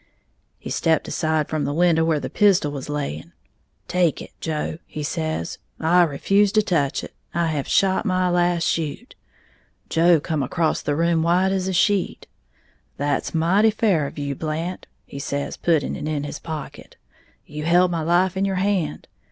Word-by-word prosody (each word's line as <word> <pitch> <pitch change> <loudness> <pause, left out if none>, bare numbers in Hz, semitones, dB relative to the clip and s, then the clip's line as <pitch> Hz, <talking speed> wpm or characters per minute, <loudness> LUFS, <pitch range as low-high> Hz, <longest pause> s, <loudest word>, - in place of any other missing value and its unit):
He - - -8
stepped 160 -1 +1
aside 155 -2 0
from 155 -2 -2
the 145 +1 -2
window, 170 -1 +3
where 160 -2 +1
the - - -4
pistol 195 -8 +3
was 140 -1 -6
laying. 145 - -4 0.5
'Take 175 -4 +1
it, - - -9
Joe,' 155 0 -3
he 150 - -6
says, 155 - -3 0.2
'I 175 +3 +4
refuse 195 +7 +2
to 215 - +4
touch 150 -9 0
it; - - -9 0.2
I 170 -1 +1
have 145 -3 -2
shot 190 +1 +2
my 185 -3 +1
last 175 -1 +2
shoot!' 165 - -2 0.8
Joe 165 0 +4
come 155 0 -2
acrost 160 +5 -1
the 145 - +1
room 165 +1 +2
white 180 +3 +2
as 190 -1 -1
a - - 0
sheet. 200 +2 +1 0.7
'That's 145 +3 -1
mighty 190 +7 +4
fair 200 -9 +1
of - - -11
you, 140 -1 -2
Blant,' 160 +5 -4 0.2
he 140 - -9
says, 140 0 -3
putting 160 -5 0
it 150 - -5
in 150 -2 -2
his 145 - -6
pocket; 160 -2 -8 0.5
'you 150 +1 -6
held 175 +2 +4
my 165 -2 -1
life 175 +3 +2
in 190 - 0
your 195 -1 0
hand.' 185 -5 -1
165 Hz, 175 wpm, -22 LUFS, 150-180 Hz, 0.8 s, I